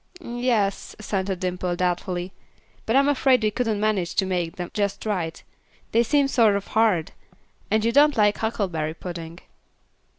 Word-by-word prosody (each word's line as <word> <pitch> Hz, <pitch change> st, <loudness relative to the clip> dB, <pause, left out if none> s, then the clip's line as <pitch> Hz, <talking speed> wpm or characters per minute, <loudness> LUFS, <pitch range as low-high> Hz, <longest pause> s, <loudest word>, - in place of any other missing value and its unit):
"Yes," 240 Hz, -, -1 dB
assented 195 Hz, -3 st, -3 dB
Dimple, 180 Hz, -1 st, -2 dB
doubtfully, 180 Hz, +1 st, -2 dB, 0.5 s
"but 225 Hz, -, +1 dB
I'm 275 Hz, +1 st, +5 dB
afraid 265 Hz, -4 st, +3 dB
we 215 Hz, -, +2 dB
couldn't 220 Hz, -2 st, -1 dB
manage 205 Hz, -5 st, 0 dB
to 190 Hz, -, +2 dB
make 175 Hz, -3 st, -2 dB
them 175 Hz, -1 st, -6 dB
just 200 Hz, 0 st, -2 dB
right; 180 Hz, -6 st, -3 dB, 0.5 s
they 230 Hz, -, +4 dB
seem 280 Hz, +4 st, +2 dB
sort 225 Hz, -6 st, +3 dB
of 200 Hz, -, -4 dB
hard; 215 Hz, -8 st, +2 dB, 0.6 s
and 220 Hz, 0 st, +1 dB
you 230 Hz, -, +3 dB
don't 290 Hz, +1 st, +4 dB
like 210 Hz, -1 st, +3 dB
huckleberry 175 Hz, -8 st, -2 dB
pudding." 170 Hz, -1 st, -8 dB
205 Hz, 155 wpm, -24 LUFS, 180-225 Hz, 0.6 s, I'm